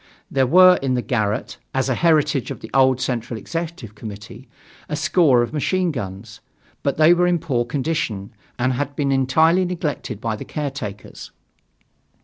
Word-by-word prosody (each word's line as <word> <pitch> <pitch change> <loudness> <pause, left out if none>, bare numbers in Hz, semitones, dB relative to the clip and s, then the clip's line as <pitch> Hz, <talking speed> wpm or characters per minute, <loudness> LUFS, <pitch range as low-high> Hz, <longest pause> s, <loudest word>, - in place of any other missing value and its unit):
There 135 -2 +2
were 185 +5 +7
in 130 -2 0
the 125 - -1
garret, 110 -5 -2 0.2
as 135 -1 +1
a 130 - +1
heritage 155 -3 +2
of - - -7
the 110 - -10
old 130 -1 +4
Central 120 -2 -3
Executive 165 - -6
Committee, 110 +3 -10 0.4
a 150 - -2
score 145 -7 +3
of 120 - -5
machine 180 +4 0
guns, 105 -3 -7 0.4
but 140 - -1
they 155 +2 +6
were 180 0 +2
in 175 -1 +2
poor 125 -7 -1
condition 125 -7 -3 0.2
and 130 +1 +1
had 140 +2 -3
been 140 -2 0
entirely 160 +7 +3
neglected 160 - -3
by 110 -1 -2
the - - -7
caretakers. 135 -9 -6
135 Hz, 160 wpm, -21 LUFS, 120-160 Hz, 0.4 s, were